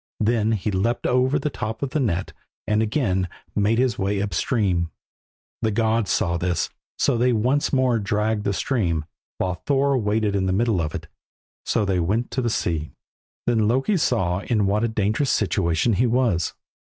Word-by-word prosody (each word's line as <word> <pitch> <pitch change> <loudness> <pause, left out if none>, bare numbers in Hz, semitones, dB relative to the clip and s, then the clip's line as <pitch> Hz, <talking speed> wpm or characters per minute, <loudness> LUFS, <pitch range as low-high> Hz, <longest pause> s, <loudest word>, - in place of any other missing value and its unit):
Then 110 0 +2
he 105 0 -1
leapt 110 +5 0
over 130 +3 +2
the 145 +1 -2
top 110 +2 -4
of 135 - -2
the 155 - 0
net 95 -9 -1 0.3
and 105 +1 +1
again 105 - 0 0.3
made 105 +2 +2
his 125 -2 +1
way 100 +1 0
up 100 0 -2
the - - -3
stream. 95 -9 +1 0.7
The 110 - +1
gods 110 0 +1
saw 85 -5 +1
this, 90 0 -1 0.3
so 120 - +2
they 125 +1 +3
once 125 +6 +1
more 130 -4 +2
dragged 105 +1 0
the 100 - 0
stream, 90 - 0 0.3
while 90 -2 -2
Thor 140 0 +3
waded 105 -1 0
in 95 -1 +1
the 95 - +1
middle 105 -2 +1
of 75 -1 -3
it. - - -5 0.6
So 110 - +1
they 95 -2 +1
went 105 +8 0
to 130 - -1
the 120 - 0
sea. 80 -8 -2 0.5
Then 110 -3 +2
Loki 135 - +2
saw 95 - +1
in 105 0 0
what 105 +3 +1
a - - +3
dangerous 110 +5 0
situation 95 +1 +1
he 120 +6 +2
was. 115 - +1
110 Hz, 185 wpm, -23 LUFS, 95-120 Hz, 0.7 s, they